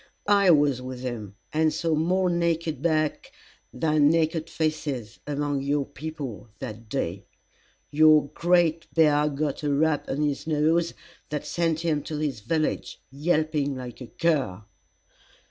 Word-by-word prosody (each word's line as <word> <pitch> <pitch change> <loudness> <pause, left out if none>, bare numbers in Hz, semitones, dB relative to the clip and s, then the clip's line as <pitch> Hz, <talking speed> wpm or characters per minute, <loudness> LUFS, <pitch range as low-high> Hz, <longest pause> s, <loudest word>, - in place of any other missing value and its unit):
I 200 -2 +5
was 145 -5 +4
with 130 -1 -7
him, 110 -6 -5 0.2
and 155 0 +3
saw 165 0 -1
more 180 +4 +2
naked 170 -4 0
backs 155 - 0 0.4
than 155 -2 +3
naked 160 0 +1
faces 145 -8 -3
among 145 -1 -1
your 140 0 0
people, 135 -10 -7
that 115 -3 -8
day. 100 -6 -3 0.6
Your 155 -1 +6
Great 170 -2 +2
Bear 150 -2 +4
got 145 0 -2
a 145 -1 0
rap 150 +1 +1
on 145 +3 -1
his 145 0 -2
nose 160 +2 +2 0.3
that 150 -1 -3
sent 165 -2 0
him 160 -3 0
to 155 - -5
his 145 -6 -2
village 155 +9 -2
yelping 150 -1 0
like 125 -1 -8
a 125 - -7
cur." 135 - 0
150 Hz, 140 wpm, -26 LUFS, 135-160 Hz, 0.6 s, Your